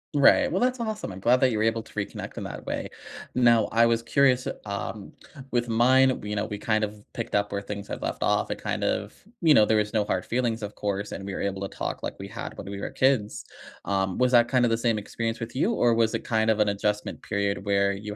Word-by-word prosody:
Right. 140 - +5
Well, 185 - 0
that's 255 +2 +1
awesome. 220 - -3
I'm 90 - -8
glad 120 +6 +4
that 130 - +4
you're 110 -2 -1
able 115 0 +1
to - - -18
reconnect - - -5
in - - -5
that - - -7
way. - - -3 0.5
Now, 120 -3 +4
I 115 +1 +5
was 115 0 +2
curious, 130 0 +2 0.2
um, 100 0 -5 0.4
with 120 -1 0
mine, 130 +3 +4
you 105 0 -3
know, 100 +1 -1
we 105 - -5
kind 110 +1 0
of 105 0 -5
picked - - -4
up 105 0 +1
where 100 0 -2
things 100 0 -6
have - - -5
left - - -3
off. - - +1
It - - -3
kind - - -3
of - - -1 0.3
you 160 -3 +6
know, 110 - +6
there 110 - +2
was 105 0 0
no 110 -2 +2
hard 95 -2 -1
feelings, 120 -2 -1
of 105 0 -5
course, 100 0 -3
and 95 - -6
we 100 - -4
were - - -4
able 95 -1 -2
to 100 - -2
talk - - -3
like - - -4
we 95 - -7
had 115 +3 -7
when 100 - -7
we 100 - -5
were - - -3
kids. 130 -6 +1 0.4
Um, 95 -1 0
was 125 0 +3
that 120 -1 +6
kind 125 -1 +3
of 115 - +1
the 115 - +2
same 115 -2 +1
experience 115 +2 -3
with 115 +1 -6
you, 200 - +1
or 120 - +3
was 115 -1 +2
it - - -3
kind 110 -1 +1
of 110 -1 +2
an 105 -1 +3
adjustment 105 +1 -2
period 100 -2 -2
where 100 -1 +2
you 105 +1 -6
110 Hz, 260 wpm, -26 LUFS, 100-120 Hz, 0.5 s, you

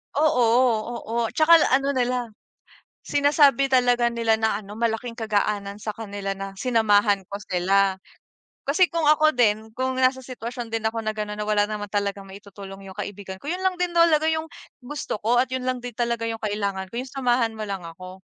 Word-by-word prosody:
Oo, 290 -4 +3 0.6
oo, 225 - -6 0.2
'tsaka 320 +2 +6 0.2
ano 275 +1 +2
nila 250 -1 0 0.8
sinasabi 285 -2 +4
talaga 245 -2 +3
nila 230 -1 +1
na 220 -1 0
ano 205 0 -11
malaking 230 +1 -2
kagaanan 205 -2 -1
sa 215 - -4
kanila 200 -2 -5
na 195 0 -6
sinamahan 210 -4 +3
ko 200 - -6
sila. 190 +2 +2 0.7
Kasi 330 +5 +3
kung 330 0 -1
ako 310 0 +5
din, 220 -2 +1
kung 260 0 0
nasa 260 0 +2
sitwasyon 240 -1 -6
din 225 - -1
ako 225 0 -4
na 215 - -1
ganon, 210 0 -4
na 210 - -2
wala 210 -1 +3
naman 210 -1 -4
talagang 200 -1 -2
maitutulong 195 0 -11
yung 190 - -11
kaibigan 195 -2 -6
ko - - -14
yun 360 +3 -3
lang 375 -1 +2
din 360 -1 -1
talaga 335 -2 +4
yung 320 0 -1 0.3
gusto 275 -2 -5
ko 235 +3 +2
at 260 - -2
yun 260 -1 -3
lang 255 - -1
din 245 0 -7
talaga 235 -1 -1
yung 225 -1 -5
kailangan 200 -3 -2
ko - - -6
yung 260 - -9
samahan 245 -4 +1
mo - - -6
lang 195 -2 -4
ako. 185 +3 -10
225 Hz, 185 wpm, -24 LUFS, 205-260 Hz, 0.8 s, tsaka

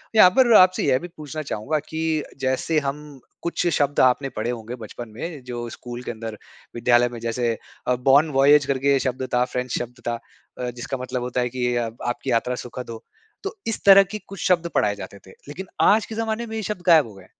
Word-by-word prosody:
यहाँ 185 -4 +9
पर 245 -3 +6
आपसे 185 -1 +6
यह 130 -1 +3
भी 175 - -7
पूछना 155 +1 -6
चाहूँगा 145 +9 -1
कि 160 -1 -1 0.2
जैसे 135 +4 +1
हम 145 +2 -3 0.4
कुछ 170 +1 -1
शब्द 145 -3 +1
आपने 130 +2 +3
पढ़े 110 +3 -2
होंगे 120 0 -6
बचपन 115 +2 -8
में 155 +2 -6
जो 120 -1 -5
स्कूल 120 +1 -8
के 120 - -4
अंदर, 110 -1 -7 0.4
विद्यालय 120 +1 +3
में 120 -1 -8
जैसे 115 0 -1 0.3
अ, 125 - +3
बॉन 135 +5 +4
वॉयेज 145 +1 +6
करके 140 0 +2
शब्द 130 +1 -2
था 125 0 +4
फ्रेंच 125 0 -4
शब्द 125 +1 -6
था। 120 -1 -1 0.4
अ, 125 -1 -2
जिसका 130 +3 -5
मतलब 125 0 -4
होता 125 0 -1
है 125 - -1
कि 125 -1 -1
आपकी 120 +2 -3
यात्रा 125 +2 +1
सुखद 125 0 -7
हो। 115 0 -8 0.4
तो 395 - -4
इस 225 - -1
तरह 195 0 +9
की 195 +3 -6
कुछ 195 -1 -9
शब्द 170 -2 +2
पढ़ाए 105 -1 +2
जाते 100 0 -9
थे, 95 - -17 0.2
लेकिन 180 +6 -7
आज 215 +2 +5
के 220 - -8
ज़माने 225 +1 -2
में 220 - -6
ये 220 - -2
शब्द 205 -2 -4
गायब 160 -6 +6
हो 110 - -12
गए। 95 -1 -14
130 Hz, 215 wpm, -23 LUFS, 120-160 Hz, 0.4 s, यहाँ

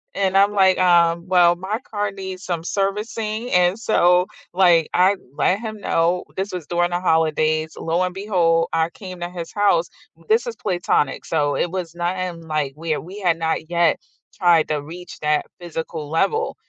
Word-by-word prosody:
and 195 -1 0
I'm 200 +1 +4
like, 190 -2 +4
um, 170 -1 +3
"Well, 175 -2 +5
my 190 +5 -3
car 205 -1 -1
needs 190 -1 -7
some 170 -4 -3
servicing, 215 +4 -2
and 180 +3 +3
so, 180 -5 +3 0.3
like, 175 -4 +4
I 185 +3 +4 0.2
let 190 - +2
him 215 -1 -6
know, 175 -2 +1
this 195 +2 -3
was 180 -4 -5
during 175 0 +1
the 175 0 -1
holidays, 155 -2 +1
lo 165 +2 0
and 180 -1 -1
behold, 175 -5 +1
I 165 0 +1
came 185 0 -10
to 175 0 -4
his 175 -2 -7
house 200 -5 +2 0.4
this 450 +3 +2
is 470 - -4
platonic, 175 -7 -1
so 145 -3 0
it 175 - 0
was 175 -3 -4
not 175 +2 -2
in 180 -2 -4
like, 150 -3 -1
we 160 0 -2
we 190 +5 -9
had 175 -4 +1
not 160 -1 -2
yet 170 -1 +2 0.4
tried 175 -4 +3
to 150 -2 -1
reach 175 +4 -10
that 150 0 +1
physical 165 -3 -6
level 440 - 0
175 Hz, 180 wpm, -21 LUFS, 165-190 Hz, 0.4 s, Well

